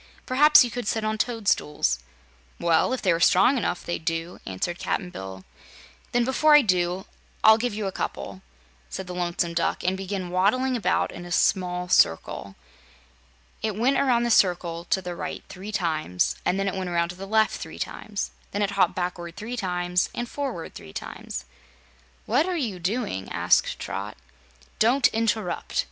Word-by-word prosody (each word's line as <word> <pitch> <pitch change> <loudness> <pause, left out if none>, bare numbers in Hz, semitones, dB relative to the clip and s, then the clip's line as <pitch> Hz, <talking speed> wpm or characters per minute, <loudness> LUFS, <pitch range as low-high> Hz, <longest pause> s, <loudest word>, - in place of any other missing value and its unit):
Perhaps 290 +2 +7
you 240 - -3
could 245 -3 -4
sit 220 0 0
on 215 0 -1
toadstools." 210 - +1 0.6
"Well, 170 +4 +3
if 260 - -2
they 185 -4 +4
were 165 - -1
strong 190 +10 +5
enough, 185 -7 -2
they'd 170 -2 -3
do," 165 +1 -3
answered 95 - -3
Cap'n 180 -2 -2
Bill. 95 - -8 0.7
"Then, 240 0 +2
before 300 +4 +5
I 295 - +7
do 185 -2 +1 0.4
I'll 220 0 +8
give 245 -2 -1
you 210 -1 -3
a 195 - -1
couple," 95 - -5 0.5
said 190 - -5
the 180 - -7
Lonesome 175 -1 -1
Duck, 170 0 0
and 185 +1 +1
began 190 -2 -4
waddling 250 +8 +2
about 230 - +1
in 175 - -8
a 175 - -9
small 180 0 +1
circle. 95 - +2 1.1
It 215 -2 -1
went 255 +6 +2
around 245 -3 +3
the 240 - +1
circle 175 -4 +2
to 190 +2 0
the 180 -1 -4
right 170 - -5
three 195 +3 -7
times, 155 - 0
and 190 - +1
then 195 - 0
it 195 - -1
went 185 -1 -3
around 170 -1 +1
to 180 - -7
the 195 +2 -8
left 220 +1 +2
three - - -8
times. 210 -2 -4 0.2
Then 205 +1 0
it 200 - 0
hopped 200 -1 +2
backward 175 -1 -4
three 230 +4 -5
times 180 -4 0
and 240 - -3
forward 265 - -5
three 80 - -11
times. - - -6 0.8
"What 275 - +2
are 365 -1 -1
you 220 - -2
doing?" 180 - -2
asked - - +2
Trot. - - -5 0.6
"Don't 250 +3 +4
interrupt. 220 -5 -1
190 Hz, 175 wpm, -25 LUFS, 175-225 Hz, 1.1 s, I'll